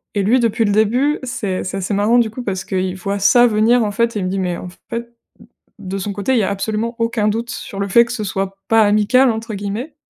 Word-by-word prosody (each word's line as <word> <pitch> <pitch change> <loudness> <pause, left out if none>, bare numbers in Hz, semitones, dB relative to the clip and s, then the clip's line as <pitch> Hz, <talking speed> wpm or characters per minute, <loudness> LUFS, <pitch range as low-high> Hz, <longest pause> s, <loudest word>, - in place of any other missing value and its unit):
et 200 - +1
lui 245 +6 +3
depuis 230 0 +1
le 205 - +1
début, 245 +8 +2
c'est 205 -7 -3
c'est 190 +1 -4
assez 195 +2 -3
marrant 210 +4 +3
du 230 -2 +3
coup 245 +3 -7
parce 190 -3 -3
qu'il 185 -1 -2
voit 200 +2 -3
ça 240 +5 +5
venir 225 +2 +3
en 205 - -2
fait 230 +2 0
et - - -1
il 185 - -2
me 185 - -1
dit: 195 +1 -2
«Mais 180 -2 -2
en 180 - -8 0.2
fait» 235 - -2
d 235 - -17 0.7
de 195 -1 -5
son 200 +1 -4
côté 205 +6 -1
il - - +3
y - - +1
a - - 0
absolument 220 +4 -2
aucun 230 -2 0
doute 230 +3 -2
sur 200 -3 -7
le 200 - -1
fait 235 +4 +5
que 235 - -8
ce 225 -3 -3
soit 195 0 -3
pas 225 0 +5
«amical» 215 +5 +3
entre 225 0 -5
guillemets 210 +9 -5
215 Hz, 270 wpm, -18 LUFS, 195-235 Hz, 0.7 s, ça